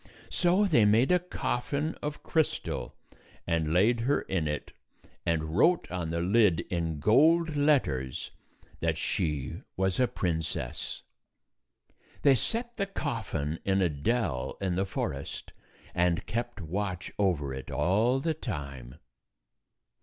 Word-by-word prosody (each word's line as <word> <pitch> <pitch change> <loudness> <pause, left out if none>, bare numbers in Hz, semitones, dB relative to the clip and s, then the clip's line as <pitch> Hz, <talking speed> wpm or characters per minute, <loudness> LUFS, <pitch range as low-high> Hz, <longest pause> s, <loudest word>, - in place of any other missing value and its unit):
So 185 +4 +3
they 150 - +4
made 110 +8 +4
a 180 - +5
coffin 140 -2 -2
of 150 0 -4
crystal 160 -2 -1 0.5
and 80 -2 0
laid 105 +8 +4
her 130 +5 +1
in 85 -5 -1
it, 75 0 -3 0.6
and 85 -2 +2
241 80 +1 -5
wrote 165 - +3
on 90 -3 -2
the 85 +1 -1
lid, 95 -2 +4
in 80 -3 -1
gold 160 - +4
letters, 125 - +1 0.5
that - - 0
she 75 -5 -2 0.2
was 95 +2 +1
a 125 - +4
princess. 80 -7 -3 1.2
They 140 - +7
set 235 - -2
the 200 -2 0
coffin 110 - -3
in 95 0 +2
a 90 - +3
dell 75 - -1
in 95 -3 -1
the 95 +2 0
forest 70 -6 -4 0.4
and 85 -1 +1
kept 120 -1 -3
watch 90 +2 -3
over 80 -9 +1
it 65 0 -7
all 110 +8 +2
the 160 +4 0
time. 70 - -6
95 Hz, 130 wpm, -29 LUFS, -, 1.2 s, They